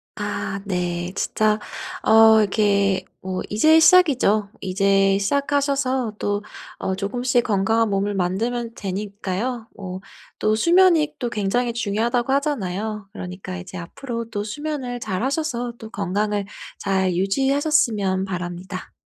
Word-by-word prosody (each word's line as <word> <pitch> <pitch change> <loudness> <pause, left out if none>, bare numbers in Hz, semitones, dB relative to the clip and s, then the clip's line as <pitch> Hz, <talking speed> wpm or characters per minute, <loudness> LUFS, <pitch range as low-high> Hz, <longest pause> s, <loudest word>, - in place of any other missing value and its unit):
아. - - -3 0.2
네. 175 -2 -2
진짜 215 -1 +1 0.5
어 220 0 +7
이렇게 200 -2 +2 0.2
뭐 185 0 -3
이제 310 +10 +5
시작이죠. 270 - +5
이제 195 +1 +2
시작하셔서 275 0 0
또 205 0 -1 0.4
어 190 - -2
쪼금씩 245 +5 0
건강한 220 +2 +2
몸을 200 +1 0
만들면 225 +6 -1
되니까요. 205 +4 -4
뭐 185 -2 -6 0.4
또 215 0 +2
수면이 335 +3 +4
또 245 - -2
굉장히 235 +3 0
중요하다고 235 +3 0
하잖아요. 215 - -2
그러니까 185 -2 -7
이제 185 +1 -8
앞으로 230 +7 -6
또 205 -2 -3
수면을 265 -1 -4
잘하셔서 245 - -2
또 220 - -10
건강을 205 0 -1 0.3
잘 190 -1 +1
유지하셨으면 220 - +1
바랍니다. 180 0 -6
210 Hz, 280 characters per minute, -22 LUFS, 195-245 Hz, 0.5 s, 어